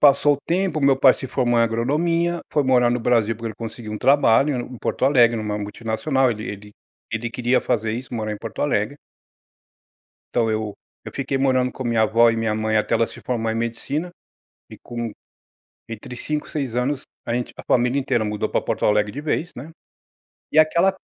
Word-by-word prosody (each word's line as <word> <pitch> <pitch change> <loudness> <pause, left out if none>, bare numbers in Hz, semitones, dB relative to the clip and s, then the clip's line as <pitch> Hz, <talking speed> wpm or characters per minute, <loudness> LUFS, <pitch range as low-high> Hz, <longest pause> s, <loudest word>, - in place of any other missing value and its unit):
passou 145 0 +5
o - - -8
tempo, 180 -2 0
o - - -4
meu 135 -1 +5
pai 135 -1 +7
se 130 - -6
formou 120 -2 +1
em - - +5
agronomia, 165 +9 0
foi 145 -2 +2
morar 125 -2 +4
no 125 - +1
Brasil 115 -2 +2
porque 115 0 -6
ele 110 - -7
conseguiu 115 -1 -7
um 105 - -4
trabalho 140 0 +4
em 125 0 -6
Porto - - -1
Alegre 120 -4 +5
em - - -2
uma 105 -1 -3
multinacional. 115 +6 0
Ele 110 -1 -4
ele 105 +1 -8 0.4
ele 115 0 -3
queria 125 +2 +1
fazer 110 -1 -1
isso, 125 +1 -6
morar 110 -1 -2
em 105 - -6
Porto 115 - -5
Alegre. 140 -1 0 1.4
Então 115 -2 +2
eu 110 -1 -2 0.3
eu - - -8
fiquei 135 0 -2
morando 130 -2 +2
com 130 - -6
a - - -3
minha 115 -2 +2
avó 115 +2 +5
e 115 - -2
minha 110 -1 0
mãe 110 0 0
até 105 - +1
ela 115 - +3
se - - -11
formar 115 -3 -2
em - - -3
medicina. 135 +9 -3 0.6
E - - -11
com, 120 -2 -5 0.8
entre 115 +2 -8
5, 150 +4 -3
6 135 -6 -3
anos 135 +2 0 0.2
a 115 - -1
gente 125 0 -3
a - - -9
família 125 +2 +2
inteira 120 -5 0
mudou 105 0 -2
para - - +1
Porto - - -2
Alegre 105 0 +2
de 145 - -5
vez, 160 +3 -2
né. 145 +7 -8 0.8
E 155 - +5
aquela 170 +5 +4
120 Hz, 210 wpm, -22 LUFS, 110-140 Hz, 1.4 s, pai